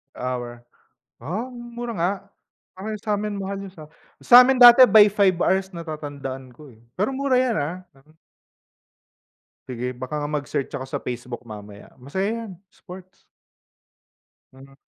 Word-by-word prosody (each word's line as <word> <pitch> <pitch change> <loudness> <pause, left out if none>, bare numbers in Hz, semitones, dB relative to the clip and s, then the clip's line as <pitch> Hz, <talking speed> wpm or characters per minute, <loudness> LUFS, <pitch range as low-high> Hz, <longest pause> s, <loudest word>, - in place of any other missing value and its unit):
Hour. 120 -1 -5 0.6
Ah, 185 - -4
mura 240 -1 -7
nga. 175 +3 +1 0.9
Sa'min 210 0 -2
mahal 195 +1 -4
yung 190 - -13
sa 155 -3 -13 0.3
sa'min 250 +2 +7
dati 245 +1 +10
by 215 -3 +7
5 200 -2 +3
hours 190 0 +1
natatandaan 145 -6 -7
ko, 150 0 -15
eh. 110 - -20 0.2
Pero 205 +7 -1
mura 270 0 -1
'yan, 250 -3 +2
ah. 150 +3 -2 0.2
Hmm. 145 +4 -26 1.5
Sige, 125 0 -4
baka 130 +4 -6
nga 145 0 -3
mag-search 145 -2 -3
ako 135 -2 -5
sa - - -3
Facebook 125 0 -6
mamaya. 105 -2 -12
Masaya 190 +10 -2 0.2
'yan, - - -9 0.2
sports. 185 +1 -13 1.4
Hmm. 135 +1 -16
155 Hz, 135 wpm, -23 LUFS, 130-210 Hz, 1.5 s, dati